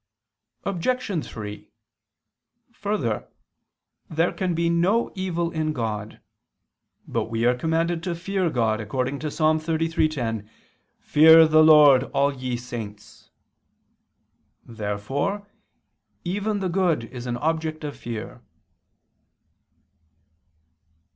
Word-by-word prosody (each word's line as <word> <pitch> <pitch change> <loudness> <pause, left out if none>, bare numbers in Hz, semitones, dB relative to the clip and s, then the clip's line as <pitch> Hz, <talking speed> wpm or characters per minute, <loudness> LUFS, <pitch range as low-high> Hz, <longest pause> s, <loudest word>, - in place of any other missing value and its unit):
Obj. 200 -1 -1
3: 105 -1 -8 1.0
Further, 155 - -2 0.8
there 165 +2 +1
can 180 -3 -2
be 170 +1 +1
no 180 +8 +2
evil 175 -3 -2
in 155 -1 -1
God. 110 -5 -4 0.9
But - - -1
we 115 0 -2
are 125 - +5
commanded 165 +4 0
to 175 -2 -2
fear 185 +1 -1
God, 110 -5 0
according 130 +5 -2
to 155 - -3
Ps. - - -9
33:10: 155 -8 0 0.5
"Fear 160 +1 +7
the 155 0 +5
Lord, 150 -4 +7
all 140 +1 +3
ye 130 -2 -3
saints." 115 -4 -9 1.4
Therefore 120 - -3 0.8
even 205 +3 -2
the 190 - 0
good 175 -7 +1
is 125 +1 -8
an 120 0 -2
object 160 +2 -2
of 145 -1 -5
fear. 115 -2 -7
155 Hz, 100 wpm, -24 LUFS, 120-170 Hz, 1.4 s, Fear